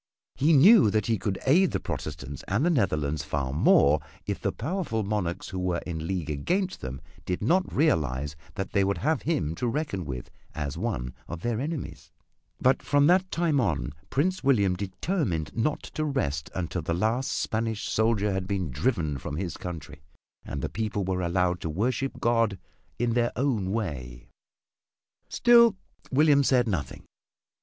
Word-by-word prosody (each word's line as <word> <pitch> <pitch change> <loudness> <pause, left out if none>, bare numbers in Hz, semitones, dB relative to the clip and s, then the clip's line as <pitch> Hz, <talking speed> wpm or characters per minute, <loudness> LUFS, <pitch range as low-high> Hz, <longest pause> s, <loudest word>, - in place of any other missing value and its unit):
He 150 +4 +2
knew 180 - +7
that 105 0 +1
he 115 -3 0
could 95 0 -2
aid 175 +7 +5
the - - 0
Protestants 70 -2 -6
and 105 - +1
the 175 - +3
Netherlands 75 - 0
far 70 -3 -2
more 75 0 +5 0.3
if - - -3
the - - 0
powerful 140 - -2
monarchs 95 -4 -2
who 95 - -4
were 90 -1 0
in 80 -2 -4
league 90 -4 -2
against 180 - -1
them 65 +1 -6 0.2
did 90 +2 -3
not 180 - +2
realize 75 - +1 0.2
that 95 -2 -4
they 100 - +3
would 100 +1 0
have 155 0 0
him 85 - -1
to 120 +9 -2
reckon 115 - -2
with 65 -5 -6 0.2
as 75 -1 -3
one 80 - -3
of 85 -1 -6
their 115 0 -1
enemies, 150 +1 -5 0.5
but 130 +1 +3
from 145 0 +3
that 185 +3 +4
time 165 -6 +1
on 80 - -1 0.2
Prince 185 +6 0
William 100 -9 +3
determined 95 - -2
not 150 +7 0
to 155 - -4
rest 105 - -1
until 90 0 -2
the 85 +1 -1
last 115 +8 0
Spanish 110 -1 -2
soldier 110 -2 +1
had 95 -1 -2
been 95 -7 -2
driven 80 - 0
from 70 - -5
his 85 0 -3
country 75 -4 -7 0.4
and - - -5
the - - 0
people 105 -2 -2
were 90 0 -1
allowed 90 0 0
to 80 - -3
worship 120 - -1
God 115 -4 +2 0.4
in 120 0 0
their 120 0 +2
own 115 -8 0
way. 70 - -4 1.0
Still 235 -4 +5 0.3
William 140 0 +5
said 125 -3 +3
nothing. 90 -9 -3
100 Hz, 165 wpm, -27 LUFS, 80-135 Hz, 1.0 s, knew